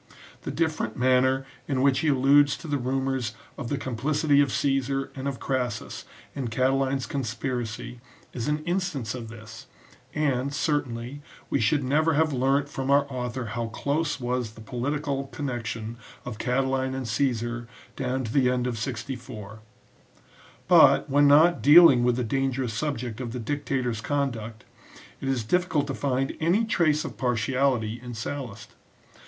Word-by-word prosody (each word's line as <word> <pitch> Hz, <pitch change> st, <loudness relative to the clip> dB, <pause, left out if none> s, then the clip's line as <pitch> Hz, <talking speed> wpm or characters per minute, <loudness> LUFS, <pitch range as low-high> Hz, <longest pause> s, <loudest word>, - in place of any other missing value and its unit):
The -, -, -5 dB
different 155 Hz, -9 st, -1 dB
manner 130 Hz, +1 st, +3 dB, 0.2 s
in 135 Hz, -2 st, 0 dB
which 140 Hz, -1 st, +4 dB
he 160 Hz, -, 0 dB
alludes 140 Hz, -1 st, +4 dB
to 140 Hz, -, -10 dB
the 145 Hz, -2 st, -1 dB
rumours 130 Hz, -2 st, -1 dB, 0.2 s
of 125 Hz, -4 st, -6 dB
the 145 Hz, -, -1 dB
complicity 145 Hz, +4 st, +1 dB
of 140 Hz, -2 st, +1 dB
Caesar 135 Hz, -1 st, 0 dB
and 135 Hz, 0 st, -4 dB
of 140 Hz, -2 st, -3 dB
Crassus 125 Hz, -4 st, -3 dB, 0.3 s
in 135 Hz, -3 st, -3 dB
Catiline's 130 Hz, +3 st, +1 dB
conspiracy 120 Hz, -2 st, -4 dB, 0.3 s
is 120 Hz, -2 st, -3 dB
an 150 Hz, +1 st, -1 dB
instance 175 Hz, -8 st, -2 dB
of 120 Hz, -3 st, -6 dB
this; 115 Hz, +3 st, -11 dB, 0.5 s
and, 140 Hz, -3 st, 0 dB
certainly, 135 Hz, -3 st, -2 dB, 0.3 s
we -, -, +2 dB
should 135 Hz, +6 st, +2 dB
never 155 Hz, +5 st, +2 dB
have 155 Hz, 0 st, +2 dB
learnt 135 Hz, +2 st, +2 dB
from 135 Hz, -2 st, -4 dB
our 140 Hz, 0 st, +5 dB
author 125 Hz, 0 st, -3 dB
how 120 Hz, -1 st, -2 dB
close 145 Hz, +7 st, -1 dB
was 125 Hz, -3 st, -2 dB
the 115 Hz, -, -14 dB
political 140 Hz, +4 st, -2 dB
connection 120 Hz, -5 st, -4 dB, 0.3 s
of 115 Hz, -3 st, -6 dB
Catiline 130 Hz, +1 st, 0 dB
and 130 Hz, -2 st, -4 dB
Caesar 120 Hz, -1 st, -1 dB, 0.3 s
down 130 Hz, 0 st, -2 dB
to 115 Hz, -1 st, -5 dB
the 130 Hz, -3 st, +4 dB
end 125 Hz, -1 st, 0 dB
of 120 Hz, -3 st, -2 dB
64. 110 Hz, -3 st, -6 dB, 1.1 s
But, -, -, +6 dB
when 145 Hz, +1 st, +5 dB
not 160 Hz, +5 st, +6 dB
dealing 145 Hz, -5 st, +8 dB
with 120 Hz, 0 st, +3 dB
the 125 Hz, -, -1 dB
dangerous 130 Hz, 0 st, -1 dB
subject 125 Hz, -3 st, -3 dB
of 120 Hz, -2 st, -5 dB
the 125 Hz, -, -4 dB
dictator 130 Hz, 0 st, -2 dB
s 110 Hz, -2 st, -5 dB
conduct, 120 Hz, -6 st, -3 dB, 0.5 s
it 135 Hz, -, -5 dB
is 130 Hz, -4 st, 0 dB
difficult 175 Hz, +2 st, +1 dB
to 140 Hz, -, -4 dB
find 135 Hz, -1 st, -1 dB
any 180 Hz, +8 st, +2 dB
trace 155 Hz, -8 st, +2 dB
of -, -, -7 dB
partiality 125 Hz, -1 st, 0 dB
in 120 Hz, -1 st, -7 dB
Sallust. 115 Hz, -2 st, -6 dB
130 Hz, 155 wpm, -26 LUFS, 120-140 Hz, 1.1 s, dealing